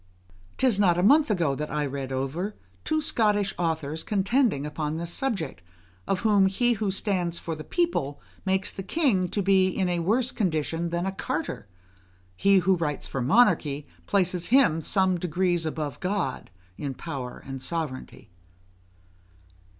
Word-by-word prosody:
'Tis 250 -6 +3
not 190 -4 +5
above 180 - +2
a - - +7
month 295 +3 +5
ago 170 -9 +1
that 150 +2 -4
I 150 0 -1
read 135 -1 -4
over, 140 +10 -2 0.3
two 315 0 0
Scottish 210 -9 +1
authors 160 -2 -1
contending 210 - +1
upon 150 +1 -3
this 170 +1 -3
subject, 200 - -2 0.5
of 190 - 0
whom 205 -3 +4
he 240 +5 +2
who 215 -2 -1
stands 185 -3 -1
for 165 - -4
the 155 -1 -7
people 155 - -1 0.2
makes 190 0 0
the 195 - -6
king 195 - +1
to 200 - -1
be 190 -1 +4
in 185 0 0
a 175 -1 0
worse 230 +9 +1
condition 165 - -1
than 170 +1 -1
a 195 - -1
carter; 165 - -4 0.7
he 195 - +4
who 185 0 +3
writes 150 -4 -2
for 135 - -3
monarchy 150 - +3 0.2
places 180 -3 +1
him 235 - +4
some 185 +1 +1
degrees 175 0 0
above 150 -4 -4
God 185 -8 -2 0.3
in 140 -2 -4
power 135 -6 -6
and 135 -1 -6
sovereignty. 150 - -5
180 Hz, 160 wpm, -26 LUFS, 155-200 Hz, 0.7 s, a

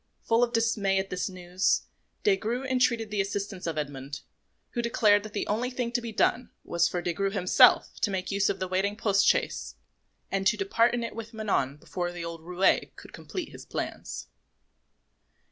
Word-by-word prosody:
Full 230 +1 +3
of 240 - +1
dismay 225 -4 +1
at 190 0 -2
this 180 +1 -1
news, 180 0 0 0.4
Des 415 -2 +5
Grieux 245 - -2
entreated 245 -4 +1
the 205 -2 +1
assistance 195 -2 -4
of 160 -2 -2
Edmond, 140 -1 -5 0.5
who 240 - -1
declared 215 -3 +4
that 215 0 -9
the - - -1
only 230 +4 -1
thing 245 -2 -3
to 240 0 0
be 230 -1 -5
done 240 +3 +1
was 170 0 +2
for 175 -1 -3
Des 175 - -1
Grieux 195 +3 0
himself 190 -2 +4
to 210 - +2
make 190 -1 -2
use 200 0 +2
of 195 - -2
the 185 - -2
waiting 190 +3 0
post 200 -3 +3
chaise - - +1 0.6
and 195 0 +1
to - - +3
depart 240 -12 +2
in 240 - -2
it 230 - -5
with 225 0 -7
Manon 150 -11 0
before 175 +3 -4
the 175 -1 -6
old 165 -1 -6
roué 180 +3 +2
could - - -13
complete 365 - -6
his - - -11
plans. - - -5
200 Hz, 195 wpm, -28 LUFS, 180-230 Hz, 0.6 s, Des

